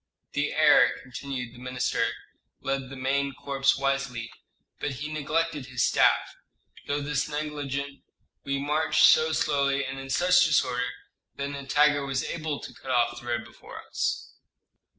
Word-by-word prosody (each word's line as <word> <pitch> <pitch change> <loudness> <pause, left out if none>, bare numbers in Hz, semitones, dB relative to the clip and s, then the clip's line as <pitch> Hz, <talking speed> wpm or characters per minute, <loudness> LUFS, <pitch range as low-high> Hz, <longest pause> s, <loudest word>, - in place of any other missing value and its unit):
"The - - 0
heir," - - +5
continued 125 -1 -6
the 120 - -13
minister, 125 -2 0 0.5
"led 135 -1 -2
the 135 - -8
main 135 +1 -1
corps 135 -1 +1
wisely, 135 -4 -2 0.5
but 145 - -2
he 150 +4 -5
neglected 155 -1 -1
his 125 -1 -1
staff; - - +3 0.5
through 145 0 -1
this 145 0 -1
neglect 150 -2 -3 0.7
we 140 0 -1
marched 150 +3 +3
so 160 0 +6
slowly 140 -3 +1
and 135 0 -5
in 135 0 -8
such 180 +6 +4
disorder 125 -5 +2 0.5
that 140 0 -3
Nitager 145 +1 +2
was 135 -2 -1
able 155 -3 -3
to - - -9
cut 130 - -11
off 120 -1 +2
the 120 - -12
road 120 -1 -1
before 120 - -12
us." - - -2
140 Hz, 150 wpm, -27 LUFS, 130-145 Hz, 0.7 s, so